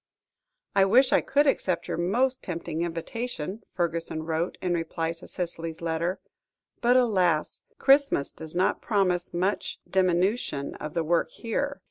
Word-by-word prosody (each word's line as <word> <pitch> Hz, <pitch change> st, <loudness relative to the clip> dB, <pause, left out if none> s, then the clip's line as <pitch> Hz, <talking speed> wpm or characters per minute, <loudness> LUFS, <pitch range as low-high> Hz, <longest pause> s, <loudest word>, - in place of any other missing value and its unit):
"I 195 Hz, -, +6 dB
wish 250 Hz, +7 st, +5 dB
I -, -, +5 dB
could 290 Hz, +2 st, +2 dB
accept 180 Hz, -, +1 dB
your -, -, -2 dB
most 245 Hz, +10 st, +1 dB
tempting 170 Hz, -2 st, -4 dB
invitation," 185 Hz, +3 st, -4 dB
Fergusson 165 Hz, -2 st, -1 dB
wrote, 165 Hz, +2 st, -2 dB
in 180 Hz, -1 st, -1 dB
reply 165 Hz, 0 st, -2 dB
to 165 Hz, -, -13 dB
Cicely's 165 Hz, -2 st, -4 dB
letter; 170 Hz, +2 st, -1 dB, 0.6 s
"but, 245 Hz, +1 st, +5 dB
alas! 185 Hz, -10 st, +2 dB, 0.2 s
Christmas 275 Hz, -, +3 dB
does 160 Hz, +1 st, -7 dB
not 185 Hz, +2 st, +1 dB
promise 185 Hz, -5 st, +1 dB
much 185 Hz, +4 st, -1 dB
diminution 185 Hz, -, +1 dB
of 150 Hz, 0 st, -7 dB
the 165 Hz, -, +1 dB
work 170 Hz, +2 st, +1 dB
here. 280 Hz, +5 st, -3 dB
175 Hz, 140 wpm, -27 LUFS, 165-225 Hz, 0.6 s, I